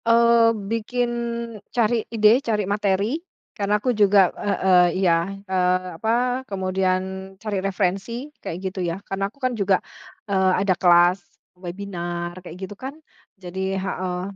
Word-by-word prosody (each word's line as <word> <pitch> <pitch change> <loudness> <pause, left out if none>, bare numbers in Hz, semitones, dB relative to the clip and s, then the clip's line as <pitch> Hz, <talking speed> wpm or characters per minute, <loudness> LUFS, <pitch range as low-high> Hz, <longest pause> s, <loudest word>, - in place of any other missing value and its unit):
Eee, 230 0 +5 0.2
bikin 240 +2 -1 0.6
cari 235 -1 +1
ide, 225 +2 +4
cari 215 -5 -1
materi 205 - 0 0.3
karena 205 0 +1
aku 250 +4 0
juga 200 -3 +4
heeh, 185 -3 +3
iya, 170 -1 +2 0.2
eee, 185 -1 +1
apa, 245 +3 +1
kemudian 185 -1 0 0.4
cari 200 -1 -3
referensi 195 +8 -2
kayak 165 - -5
gitu 190 0 -3
ya 170 -1 -2
karena 195 0 -2
aku 225 - -30
kan 255 -2 -1
juga, 200 -4 +2 0.5
eee, 190 -2 +2
ada 190 - +4
kelas 175 +1 +4 0.3
webinar 175 -1 -5
kayak 175 -1 -10
gitu 190 +2 -7
kan 265 +8 -8 0.4
jadi 190 +1 -3
heeh, 185 -1 -3
195 Hz, 135 wpm, -23 LUFS, 185-220 Hz, 0.6 s, Eee